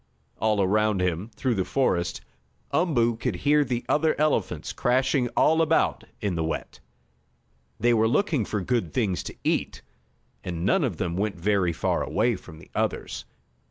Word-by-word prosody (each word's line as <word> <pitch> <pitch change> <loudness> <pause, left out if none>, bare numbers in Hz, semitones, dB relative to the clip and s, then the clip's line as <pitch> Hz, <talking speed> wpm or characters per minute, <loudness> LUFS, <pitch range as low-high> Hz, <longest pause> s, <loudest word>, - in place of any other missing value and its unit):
All 105 -2 +2
around 105 +1 +2
him, 90 +3 -1
through 130 -2 0
the 95 -4 0
forest, 90 -8 0 0.5
Umboo 120 -10 +2
could 115 -3 -2
hear 145 +10 +3
the 125 -3 -3
other 155 +1 +2
elephants 105 - 0
crashing 130 0 +1
about 160 +1 +3
in 100 -3 -1
the 80 -1 -1
wet. 80 - -4 1.0
They 120 0 +3
were 110 -1 +3
looking 150 - +1
for 105 0 -2
good 95 -6 -1
things 100 -7 +1
to - - -8
eat, - - -1 0.6
and 85 -1 -3
none 190 - +3
of 110 - -1
them 85 0 -2
went 105 0 -1
very 95 -1 +2
far 80 - 0
away 115 +1 +1
from 80 -4 -12
the - - -16
others. - - -2
110 Hz, 160 wpm, -26 LUFS, 90-130 Hz, 1.0 s, hear